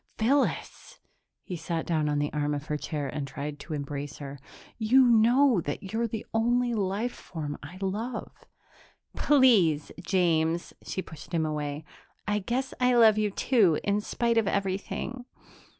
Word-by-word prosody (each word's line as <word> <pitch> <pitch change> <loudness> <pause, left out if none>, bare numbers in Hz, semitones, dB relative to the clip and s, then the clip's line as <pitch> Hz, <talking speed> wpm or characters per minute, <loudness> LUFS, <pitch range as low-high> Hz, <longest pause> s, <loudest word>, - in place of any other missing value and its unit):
"Phyllis 265 +5 0 0.2
" - - -55
he 185 - -5
sat 165 0 -3
down 155 -3 0
on 145 - 0
the 145 0 -1
arm 150 0 0
of 145 +1 -5
her 150 - -2
chair 150 -1 -3
and 140 +1 -4
tried 145 +2 -6
to 160 - -5
embrace 145 0 -5
her 140 -1 -8 0.4
"you 250 +4 +5
know 240 0 +5
that 185 +7 -5
you're 230 +1 +1
the 220 -1 -5
only 240 +2 +2
life 210 +3 -1
form 150 -4 -6
I 170 +6 -10
love." 215 +5 -3 0.8
"Please, 215 - +4
James." 170 -2 +1
She 190 - -4
pushed 160 +2 -8
him 160 -1 +1
away. 150 -1 -3 0.4
"I 210 0 +1
guess 250 +6 -2
I 250 0 +3
love 220 -3 +6
you, 210 -1 +1
too, 200 - +3
in 205 +1 +1
spite 235 +2 +1
of 220 - -1
everything 200 +6 -2
190 Hz, 160 wpm, -28 LUFS, 150-230 Hz, 0.8 s, love